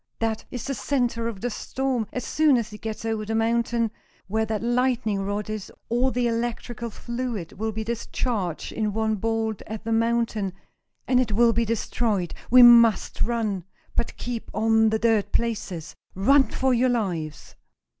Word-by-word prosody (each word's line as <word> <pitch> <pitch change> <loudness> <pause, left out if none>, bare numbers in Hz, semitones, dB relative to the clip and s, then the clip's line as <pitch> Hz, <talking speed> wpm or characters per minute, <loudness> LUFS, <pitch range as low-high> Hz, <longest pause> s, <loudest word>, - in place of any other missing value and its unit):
That 225 -1 -2
is 245 - -6
the 275 - -2
center 245 -4 -1
of 220 -5 -5
the 245 +1 -2
storm. 255 -1 -2
As 250 - -4
soon 305 -4 +3
as 225 -2 -3
it 210 - -10
gets 220 0 -5
over 220 -1 -1
the 220 +1 -3
mountain, 230 0 +1 0.3
where 220 +3 -1
that 220 0 -2
lightning 240 -4 +1
rod 205 +1 -2
is, 215 -2 -5 0.2
all 245 +3 +2
the 250 -1 0
electrical 235 0 -3
fluid 235 -6 -5
will 220 +2 -3
be 220 +1 -4
discharged 225 -5 -3
in 215 -2 -1
one 220 0 0
bolt 225 0 -1
at 220 0 -6
the 225 - -3
mountain, 225 -4 +1 0.5
and 250 -1 +4
it 235 -4 0
will 230 +2 +5
be 230 +1 +1
destroyed! 215 -4 -1 0.2
We 250 +1 +9
must 235 -4 +6
run, 215 -5 0 0.3
but - - -1
keep 240 -2 -5
on 220 0 +4
the 220 - +1
dirt 220 -2 +2
places! 200 -8 -2 0.2
Run 270 +9 +5
for 265 -1 +1
your 250 +1 +3
lives!" 180 -10 -3
225 Hz, 170 wpm, -25 LUFS, 215-240 Hz, 0.5 s, We